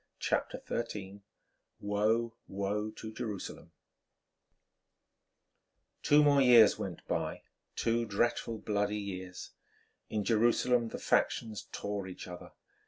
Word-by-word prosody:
CHAPTER - - -1
XIII 100 -4 -4 0.6
WOE, 110 +3 +1
WOE 100 +2 -2
TO 110 0 -8
JERUSALEM 110 -6 -6 2.3
Two 150 +1 +5
more 140 -1 +5
years 120 -4 +7
went - - -6
by, - - -2 0.3
two 115 0 +1
dreadful, 115 +2 0
bloody 105 -1 -1
years. 95 -3 -6 0.6
In 105 -1 -1
Jerusalem 120 +2 +3
the - - -6
factions 110 -2 0
tore 100 -2 -4
each 90 - -8
other. 90 -1 -9
105 Hz, 100 wpm, -32 LUFS, 100-115 Hz, 2.3 s, years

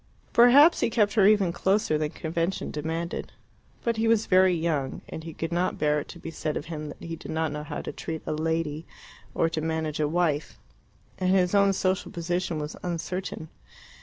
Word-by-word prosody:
Perhaps 275 +8 +7
he - - +2
kept 210 -3 +2
her 200 -3 +5
even 200 -5 +4
closer 195 -3 +1
than 150 0 0
convention 165 +3 -2
demanded. 160 +3 -4 0.5
But 230 -1 0
he 225 +1 +1
was 225 -1 +3
very 185 -1 +4
young, 155 -5 -1
and 160 - -7
he 165 - -7
could 160 +1 -5
not 175 +2 0
bear 150 0 +2
it - - -7
to - - -10
be 165 - -7
said 155 -2 -3
of - - -5
him 155 -2 -6
that - - -11
he 165 0 -4
did - - -11
not 160 -1 -1
know 150 0 -4
how 150 - -5
to - - -4
treat 160 -1 -6
a - - -2
lady 160 0 -2 0.5
or 165 - +3
to 165 -1 -3
manage 160 -1 -2
a 150 - +2
wife. 160 -2 0 0.6
And 185 -1 +1
his 185 -1 +3
own 200 -1 +5
social 185 0 -1
position 175 0 -2
was 150 0 -4
uncertain. 175 -1 -4
165 Hz, 200 wpm, -27 LUFS, 155-190 Hz, 0.6 s, Perhaps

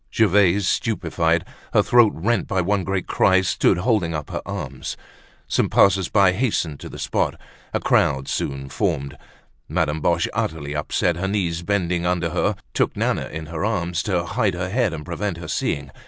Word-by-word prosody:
Gervaise, 100 -3 +3
stupefied, 85 -6 0 0.3
her - - +5
throat 120 -3 +5
rent 110 +8 0
by 95 - 0
one 95 +2 +1
great 95 -1 -2
cry, 95 0 +3
stood 95 0 +2
holding 90 -5 +1
up 75 -1 -5
her - - -3
arms. - - -5 0.5
Some - - +1
passers 95 -2 +4
by 100 -3 +5
hastened 90 - -1
to - - -8
the - - -9
spot; - - -1 0.3
a - - 0
crowd 70 -2 +2
soon 70 0 -3
formed. 75 -5 -2 0.5
Madame 80 -1 0
Boche, 85 +2 +2
utterly 75 -2 -3
upset, 80 +3 0
her 95 +2 -2
knees 90 -5 -1
bending 90 -2 0
under 85 -2 0
her, - - +1 0.2
took - - 0
Nana - - 0
in 80 +1 -6
her 80 +2 -5
arms, 90 -6 -1
to 90 -1 -1
hide 100 +1 0
her 90 +1 -3
head 115 0 +1
and 75 -2 -6
prevent 90 +1 -3
her 85 - -8
seeing. 70 -2 -2
90 Hz, 175 wpm, -22 LUFS, 80-100 Hz, 0.5 s, her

